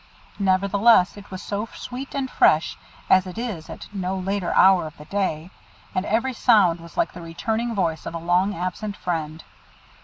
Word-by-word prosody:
Nevertheless, 195 Hz, +1 st, +4 dB
it 205 Hz, -1 st, -12 dB
was 185 Hz, 0 st, -7 dB
so 205 Hz, +2 st, -3 dB
sweet 260 Hz, +3 st, -7 dB
and 275 Hz, -1 st, -1 dB
fresh 160 Hz, -9 st, +3 dB, 0.3 s
as 185 Hz, 0 st, +4 dB
it 180 Hz, -, -8 dB
is 215 Hz, -10 st, -5 dB
at -, -, -8 dB
no 190 Hz, -1 st, -2 dB
later 190 Hz, -1 st, -2 dB
hour 190 Hz, -3 st, +5 dB
of 155 Hz, -, -12 dB
the 150 Hz, -, -12 dB
day, 185 Hz, -3 st, -2 dB, 0.4 s
and 185 Hz, +1 st, -1 dB
every 235 Hz, +5 st, 0 dB
sound 205 Hz, -8 st, +4 dB
was 170 Hz, 0 st, -13 dB
like -, -, +1 dB
the 175 Hz, -, -9 dB
returning 220 Hz, +8 st, -3 dB
voice 165 Hz, -5 st, -1 dB
of 165 Hz, -, -5 dB
a -, -, -1 dB
long 180 Hz, +4 st, +1 dB
absent 185 Hz, +4 st, -4 dB
friend. 160 Hz, -2 st, -3 dB
190 Hz, 180 wpm, -23 LUFS, 170-210 Hz, 0.4 s, hour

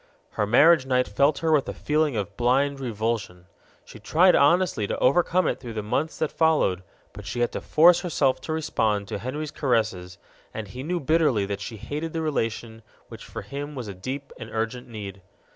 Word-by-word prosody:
Her 105 Hz, -, -1 dB
marriage 140 Hz, +5 st, +5 dB
night 125 Hz, -5 st, 0 dB
left 140 Hz, +1 st, +4 dB
her 165 Hz, -1 st, +1 dB
with 150 Hz, -3 st, +2 dB
a -, -, -5 dB
feeling 150 Hz, -2 st, 0 dB
of 100 Hz, -1 st, -3 dB
blind 135 Hz, +4 st, +1 dB
revulsion. 110 Hz, -7 st, -3 dB, 0.4 s
She -, -, -13 dB
tried 180 Hz, +3 st, +4 dB
honestly 145 Hz, -, +3 dB
to -, -, -3 dB
overcome 175 Hz, +6 st, +2 dB
it -, -, -1 dB
through 120 Hz, -3 st, -8 dB
the 105 Hz, -, -3 dB
months 140 Hz, +9 st, -2 dB
that 155 Hz, -, -1 dB
followed, 155 Hz, -, +2 dB, 0.3 s
but 105 Hz, -1 st, -10 dB
she 120 Hz, -, -3 dB
had 120 Hz, -, +1 dB
to -, -, -5 dB
force 170 Hz, +3 st, +5 dB
herself 145 Hz, -6 st, 0 dB
to -, -, -6 dB
respond 110 Hz, -10 st, -1 dB
to -, -, -4 dB
Henry's 145 Hz, +6 st, -5 dB
caresses, 110 Hz, -, -1 dB, 0.4 s
and 110 Hz, -3 st, -5 dB
he 125 Hz, +6 st, -7 dB
knew 175 Hz, +5 st, -2 dB
bitterly 150 Hz, -9 st, +2 dB
that 100 Hz, 0 st, -4 dB
she 110 Hz, +2 st, -6 dB
hated 150 Hz, +9 st, -5 dB
the 165 Hz, -, -2 dB
relation 115 Hz, -6 st, -3 dB, 0.3 s
which -, -, -10 dB
for -, -, -7 dB
him 145 Hz, +2 st, -6 dB
was 125 Hz, -4 st, -6 dB
a 100 Hz, -, -6 dB
deep 130 Hz, +9 st, -6 dB
and 110 Hz, -, -8 dB
urgent 115 Hz, +2 st, -3 dB
need. 100 Hz, -4 st, -8 dB
125 Hz, 195 wpm, -25 LUFS, 110-155 Hz, 0.4 s, marriage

